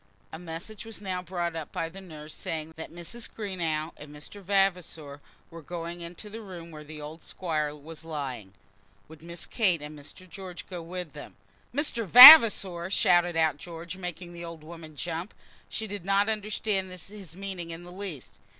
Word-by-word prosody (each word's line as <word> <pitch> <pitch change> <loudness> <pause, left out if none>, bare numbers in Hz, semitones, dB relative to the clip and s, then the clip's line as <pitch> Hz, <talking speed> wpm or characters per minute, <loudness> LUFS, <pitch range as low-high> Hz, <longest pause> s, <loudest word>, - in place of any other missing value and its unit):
A 160 - -6
message 175 +5 -8
was 225 -1 -9
now 185 -3 -3
brought 175 -2 -3
up 160 -3 -6
by 165 - -2
the 190 +4 -11
nurse, 155 -4 -10
saying 160 0 -5
that 160 - -8
Mrs. 175 +8 -7
Greenow 170 -7 -3
and 150 - -11
Mr. 150 +7 -11
Vavasor 180 -7 -1 0.3
were 165 0 -9
going 170 +2 -6
into 170 +5 -9
the 220 +2 -8
room 175 -5 -10
where 150 -1 -10
the 155 0 -10
old 150 +2 -9
Squire 155 -4 -3
was 155 +2 -11
lying, 130 -11 -6 0.5
"Would 160 -1 -14
Miss 170 0 -7
Kate 190 -8 +1
and 150 +1 -9
Mr. 185 +6 -13
George 185 -1 -9
go 180 -2 -6
with 175 -2 -7
them?" 145 - -11 0.4
"Mr. 265 -4 -1
Vavasor!" 220 - +11
shouted 175 -2 +3
out 160 -3 +2
George, 170 +2 -8
making 180 -1 -7
the 170 0 -8
old 165 -2 -9
woman 160 -1 -11
jump. 170 +5 -5 0.3
She 220 - -4
did 205 -3 -6
not 195 +2 +2
understand 210 -2 -2
his 185 -1 -10
meaning 190 -3 -6
in 165 +1 -7
the 175 - -11
least. 180 -8 -7
170 Hz, 175 wpm, -28 LUFS, 160-195 Hz, 0.5 s, Vavasor